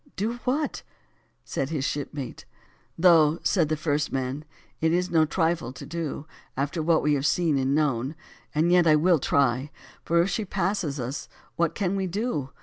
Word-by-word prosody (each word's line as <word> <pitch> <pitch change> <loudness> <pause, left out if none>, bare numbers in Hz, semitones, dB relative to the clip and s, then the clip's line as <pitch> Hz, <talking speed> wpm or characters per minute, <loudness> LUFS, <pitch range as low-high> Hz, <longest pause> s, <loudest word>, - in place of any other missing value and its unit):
"Do 225 +5 -2
what?" 290 +4 -1 0.6
said 135 - -3
his 150 -4 -2
shipmate. 145 -2 -4 0.5
"Though," 165 -3 +5
said 165 -6 +2
the 155 - 0
first 150 -1 -1
man, 135 +3 -3 0.3
"it 160 0 +2
is 180 +2 0
no 160 -2 +4
trifle 160 -4 0
to - - -9
do, 165 -3 -4 0.3
after 145 +4 -1
what 160 0 +2
we 150 0 +3
have 140 0 +1
seen 165 -3 +2
and 135 +1 +1
known; 140 -2 0 0.4
yet 170 +2 +4
I 155 - +6
will 165 +2 +4
try, 135 0 +1 0.3
for 170 +1 +2
if 185 - -2
she 220 - -1
passes 180 -6 -1
us, 125 +4 -5 0.3
what 170 -2 0
can 195 -1 0
we 190 -1 -1
do? 180 - -2
155 Hz, 170 wpm, -26 LUFS, 145-175 Hz, 0.6 s, I